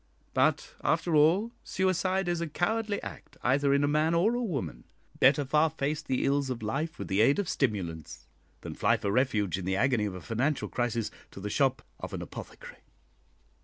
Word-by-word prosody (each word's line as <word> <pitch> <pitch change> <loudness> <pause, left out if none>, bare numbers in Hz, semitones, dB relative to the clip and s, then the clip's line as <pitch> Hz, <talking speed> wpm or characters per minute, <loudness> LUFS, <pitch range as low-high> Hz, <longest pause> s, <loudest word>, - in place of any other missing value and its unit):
But, - - +1
after 170 - +1
all, 170 +10 +4
suicide 185 0 0
is 175 -1 0
a 170 - -1
cowardly 210 +6 -1
act - - -9
either 140 +3 +3
in 140 +1 +3
a - - +3
man 155 +3 +2
or 195 +8 +3
a 245 - -1
woman; 140 - -4 0.3
better 140 +2 +5
far 150 +4 +3
face 150 0 -2
the 130 -4 -1
ills 140 -1 +1
of 120 -3 -4
life 145 +9 -2
with - - -5
the 95 +2 +2
aid 135 +6 +4
of 205 - -1
stimulants, 90 - -2 0.4
than - - -6
fly - - +2
for 100 - -2
refuge 105 -7 +1
in 90 - -6
the 95 +1 0
agony 120 0 +2
of 100 -3 -4
a - - -6
financial 130 - -1
crisis 120 -2 -1 0.2
to - - -11
the 105 +1 -4
shop 135 +1 +1 0.2
of - - -7
an - - -5
apothecary." - - -10
140 Hz, 195 wpm, -29 LUFS, 115-165 Hz, 0.4 s, better